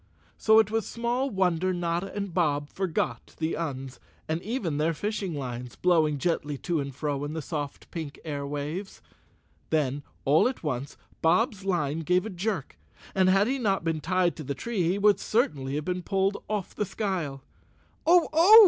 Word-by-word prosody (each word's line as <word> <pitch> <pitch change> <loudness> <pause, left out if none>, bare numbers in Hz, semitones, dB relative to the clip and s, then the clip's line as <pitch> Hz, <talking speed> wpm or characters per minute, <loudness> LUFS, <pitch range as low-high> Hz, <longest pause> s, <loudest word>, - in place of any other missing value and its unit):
So 220 0 +5
it 220 -1 +5
was 225 -3 0
small 240 +3 -1
wonder 185 -3 +1
Notta 175 +2 -1
and 200 -3 -3
Bob 145 -4 +1
forgot 165 -10 -2
the 160 0 -1
Uns, 135 -5 -4 0.3
and 160 +2 -1
even 195 - -2
their 160 +2 +2
fishing 205 -2 -2
lines, 125 -3 -5
blowing 160 -5 +3
gently 150 -2 -1
to 170 +3 -1
and 140 -1 -3
fro 145 -1 -2
in 145 +1 -3
the 160 - -3
soft 145 -3 -5
pink 155 -4 -5
air 145 -3 -3
waves. 150 +7 -4 0.7
Then, 145 -3 +1 0.2
all 145 - +5
at 255 - -4
once, 140 -2 -3 0.2
Bob's 205 +4 +3
line 165 -5 0
gave 180 +4 +2
a 220 - -4
jerk 195 +5 -3 0.3
and 190 -2 +4
had 195 +2 +5
he 265 +4 0
not 195 -7 +1
been 165 -2 -1
tied 185 +1 +2
to 155 - -5
the 140 0 -3
tree 230 - -2
he 185 - +1
would 205 -1 +4
certainly 145 - 0
have 150 0 -2
been 180 0 -1
pulled 195 +2 0
off 210 -3 -2
the - - -1
skyle. 175 -10 -2 0.6
"Oh! 345 0 +6
Oh!" 360 +8 +9
170 Hz, 180 wpm, -28 LUFS, 145-200 Hz, 0.7 s, Oh